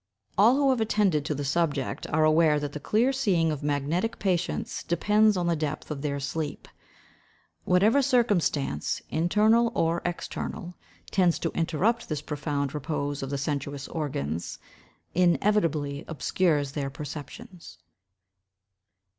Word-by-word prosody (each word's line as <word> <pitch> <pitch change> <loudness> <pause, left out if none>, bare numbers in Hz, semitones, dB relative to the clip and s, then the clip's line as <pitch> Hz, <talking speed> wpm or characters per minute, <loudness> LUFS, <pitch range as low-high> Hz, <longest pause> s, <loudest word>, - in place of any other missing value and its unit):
All 220 +6 +6
who 275 -1 +3
have 250 -3 0
attended 200 -9 +1
to 150 - -1
the 145 0 -3
subject 145 -2 -1
are 155 +1 +1
aware 155 -1 +4
that 145 -1 -4
the 150 - -5
clear 230 - +2
seeing 185 -11 +2
of 150 - -4
magnetic 150 +9 -1
patients 180 -3 -1
depends 210 +4 +3
on 175 - 0
the 170 -1 +2
depth 155 0 -4
of 145 -2 -4
their 140 -1 -2
sleep; 145 +2 -4 1.0
whatever 205 +9 +4
circumstance, 205 - +1
internal 215 +8 +3
or 165 +1 +1
external, 175 +2 -4 0.4
tends 180 -3 +3
to 165 - -2
interrupt 175 +8 0
this 150 -2 -3
profound 145 -2 -2
repose 145 -1 -3
of 135 - -4
the 140 - -2
sensuous 140 0 -3
organs, 85 - -3 0.6
inevitably 165 -5 +1
obscures 150 -1 0
their 140 -1 -3
perceptions. 155 - -9
160 Hz, 130 wpm, -27 LUFS, 145-200 Hz, 1.0 s, All